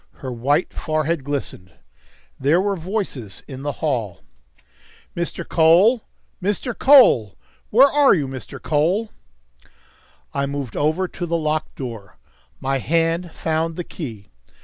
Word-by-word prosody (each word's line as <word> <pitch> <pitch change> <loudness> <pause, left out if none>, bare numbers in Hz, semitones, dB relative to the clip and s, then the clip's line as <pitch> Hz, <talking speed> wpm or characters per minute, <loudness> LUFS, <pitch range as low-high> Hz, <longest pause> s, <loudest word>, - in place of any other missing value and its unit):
Her 130 - -7
white 140 +8 0
forehead 155 -1 -1
glistened. 130 -10 -5 0.7
There 145 +6 +3
were 200 +1 0
voices 165 - -4
in 135 -2 -8
the 145 +1 -2
hall. 115 - -2 0.9
"Mr. 170 0 -4
Cole! 180 +9 +5 0.4
Mr. 205 +5 -2
Cole! 235 - +6 0.3
Where 260 +6 +7
are 285 -5 +4
you, 145 -6 -1
Mr. 130 -3 -8
Cole?" 175 +9 0 1.2
I 140 0 -1
moved 140 -4 -5
over 160 +6 +1
to 175 0 -6
the 170 0 0
locked 155 -1 -2
door. 115 -7 -8 0.4
My 135 0 -1
hand 165 +4 0
found 160 +1 -2
the 175 - -4
key. 115 - -8
155 Hz, 125 wpm, -21 LUFS, 135-180 Hz, 1.2 s, Where